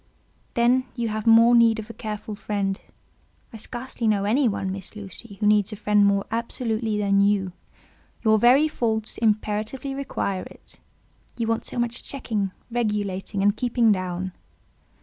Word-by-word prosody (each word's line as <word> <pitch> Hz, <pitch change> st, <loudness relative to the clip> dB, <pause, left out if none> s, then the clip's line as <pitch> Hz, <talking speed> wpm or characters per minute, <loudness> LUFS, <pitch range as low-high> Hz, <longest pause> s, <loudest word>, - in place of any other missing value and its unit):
"Then 245 Hz, +2 st, +3 dB
you 235 Hz, -3 st, -1 dB
have 215 Hz, +1 st, -3 dB
more 230 Hz, +1 st, +7 dB
need 230 Hz, -1 st, +5 dB
of 220 Hz, -1 st, -6 dB
a -, -, -12 dB
careful 215 Hz, -2 st, -6 dB
friend. 200 Hz, -1 st, -2 dB, 0.7 s
I -, -, -7 dB
scarcely 240 Hz, +1 st, -4 dB
know 205 Hz, -2 st, +2 dB
any 245 Hz, +6 st, +2 dB
one, 195 Hz, -3 st, -2 dB
Miss 195 Hz, +2 st, -6 dB
Lucy, 200 Hz, +1 st, -9 dB
who 210 Hz, -, 0 dB
needs 210 Hz, 0 st, +3 dB
a -, -, -5 dB
friend 210 Hz, 0 st, +2 dB
more 200 Hz, 0 st, +1 dB
absolutely 225 Hz, -1 st, -2 dB
than 200 Hz, -1 st, +2 dB
you; 200 Hz, -2 st, +2 dB, 0.7 s
your 220 Hz, -1 st, +4 dB
very 260 Hz, +7 st, +5 dB
faults 220 Hz, -6 st, -2 dB
imperatively 215 Hz, +4 st, -1 dB
require 225 Hz, -8 st, -2 dB
it. -, -, -13 dB, 0.6 s
You 230 Hz, -, -1 dB
want 225 Hz, 0 st, -1 dB
so -, -, -7 dB
much 240 Hz, 0 st, -1 dB
checking, 220 Hz, -7 st, -3 dB, 0.2 s
regulating, 205 Hz, -4 st, -1 dB
and 205 Hz, +1 st, +3 dB
keeping 235 Hz, -1 st, +2 dB
down." 185 Hz, -1 st, -2 dB
215 Hz, 155 wpm, -24 LUFS, 200-235 Hz, 0.7 s, more